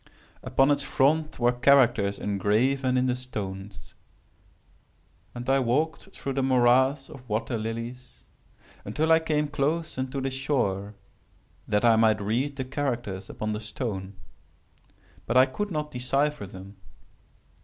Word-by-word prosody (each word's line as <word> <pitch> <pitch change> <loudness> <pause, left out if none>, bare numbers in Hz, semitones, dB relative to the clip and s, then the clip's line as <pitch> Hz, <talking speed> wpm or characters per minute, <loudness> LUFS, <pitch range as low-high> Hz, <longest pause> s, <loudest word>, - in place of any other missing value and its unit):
Upon 135 +2 +2
its 145 -1 +1
front 150 +4 +1
were 120 0 +3
characters 120 -6 +3
engraven 120 +7 +1
in 125 - +2
the 125 -1 +1
stone; 100 -6 -6 1.6
and 120 +1 -6
I 135 +1 +3
walked 150 +9 -1
through 135 - -4
the 135 - 0
morass 130 +2 +3
of 130 -5 -13
water 110 +3 -1
lilies, 115 +3 -6 0.6
until 155 +10 0
I 160 - +7
came 150 -2 0
close 150 +1 -2
unto 130 +1 -3
the 135 0 -2
shore, 110 -7 -1 0.7
that 105 +3 +1
I 115 -1 +6
might 110 -1 +4
read 120 +8 -1
the 130 -2 -4
characters 120 -8 -3
upon 110 0 -3
the 105 - -4
stone. 105 -4 -5 1.1
But 115 - +2
I 130 - +8
could 205 +10 -4
not 150 -4 -3
decypher 135 0 -1
them. 95 +2 -11
125 Hz, 135 wpm, -26 LUFS, 110-140 Hz, 1.6 s, I